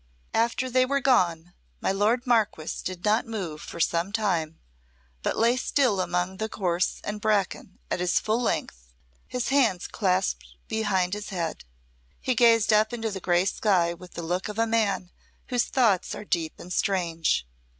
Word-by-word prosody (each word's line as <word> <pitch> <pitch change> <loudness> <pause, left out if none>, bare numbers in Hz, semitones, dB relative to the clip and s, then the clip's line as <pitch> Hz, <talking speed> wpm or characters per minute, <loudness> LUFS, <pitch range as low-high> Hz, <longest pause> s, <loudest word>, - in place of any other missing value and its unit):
After 235 +3 +1
they 255 0 +3
were 280 +2 +1
gone 175 -11 +2 0.3
my - - 0
lord 215 +6 +1
Marquess 220 -10 0
did 185 0 -5
not 215 +3 +2
move 185 -9 -5
for - - -8
some 170 +3 +1
time, 175 -8 -1 0.6
but - - -1
lay 235 +2 +4
still 250 -5 +1
among 180 +1 -1
the 220 - -2
gorse 180 -4 -1
and 210 0 -4
bracken 200 -2 0
at - - 0
his 180 0 +2
full 220 +3 0
length, - - -3 0.3
his 250 -1 -2
hands 245 -10 +2
clasped 180 - -1
behind 195 -4 0
his 210 0 -5
head. 170 - -4 0.5
He 255 - 0
gazed 230 -3 +5
up 215 +2 +3
into 225 -2 -2
the 195 - -4
grey 175 0 +2
sky 185 -4 +2
with 180 +1 -13
the 170 - -5
look 180 +3 -2
of 210 - -6
a 225 - +3
man 215 -5 0 0.4
whose 245 -2 +1
thoughts 220 -8 +2
are - - -8
deep 165 -5 -1
and 180 - -7
strange. 170 - 0
195 Hz, 170 wpm, -26 LUFS, 175-225 Hz, 0.6 s, gazed